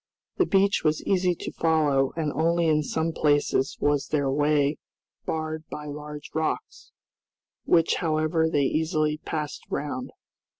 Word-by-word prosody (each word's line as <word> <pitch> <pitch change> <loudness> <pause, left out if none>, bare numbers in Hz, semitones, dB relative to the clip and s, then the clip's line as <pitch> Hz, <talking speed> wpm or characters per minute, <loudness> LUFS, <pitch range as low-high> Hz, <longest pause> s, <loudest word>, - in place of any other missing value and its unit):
The 370 - +3
beach 195 +1 +3
was 155 -1 +1
easy 180 -2 +2
to - - -6
follow, 150 -5 +2
and 155 -3 -1
only 170 +2 +2
in 155 -1 +3
some 160 +2 -1
places 145 -3 +1
was 145 -1 +1
their 140 -3 0
way 145 0 +2 0.5
barred 155 0 -3
by 150 - -6
large 150 0 -8
rocks, 160 0 -3 0.7
which, 165 -1 +3
however, 160 0 +1
they 145 -3 +2
easily 155 0 0
passed 150 -2 -4
round. 135 -3 -3
155 Hz, 135 wpm, -26 LUFS, 145-160 Hz, 0.7 s, The